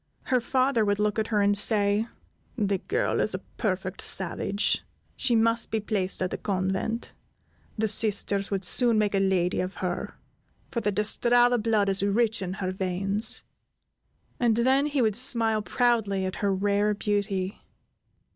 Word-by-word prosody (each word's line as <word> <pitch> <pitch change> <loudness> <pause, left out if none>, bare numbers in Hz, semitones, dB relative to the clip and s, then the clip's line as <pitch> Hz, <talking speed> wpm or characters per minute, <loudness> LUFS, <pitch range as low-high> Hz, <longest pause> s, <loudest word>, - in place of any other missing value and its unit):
Her 255 -2 +1
father 255 -1 +1
would 205 -1 0
look 210 +1 0
at 220 - -1
her, 210 -3 +1
and 205 0 +3
say: 205 +1 +2 0.5
"The 200 -3 0
girl 450 - -1
is - - 0
a - - -8
perfect 190 -3 -2
savage; 195 +2 +2 0.3
she 250 -3 +1
must 230 +1 +2
be 220 - -1
placed 200 -3 -2
at 185 - -3
a - - -2
convent; 190 +4 -2 0.6
the 220 0 0
Sisters 200 -2 0
would 195 -2 -1
soon 235 +2 +3
make 210 -1 +1
a 195 - +2
lady 190 -2 +1
of 185 +2 -3
her, 180 -1 -4 0.6
for 235 - -2
the 210 - 0
De 210 +1 -1
Strada 245 +2 +3
blood 215 -2 +1
is 195 0 +1
rich 220 +2 0
in 185 -1 -4
her 190 -1 -3
veins;" 195 +3 0 1.0
and 235 -3 +2
then 265 +4 +2
he 285 -4 0
would 215 -3 +1
smile 230 -3 +3
proudly 210 -5 0
at 185 - -4
her 200 -1 0
rare 205 +2 +1
beauty. 200 -2 -2
210 Hz, 165 wpm, -26 LUFS, 195-230 Hz, 1.0 s, and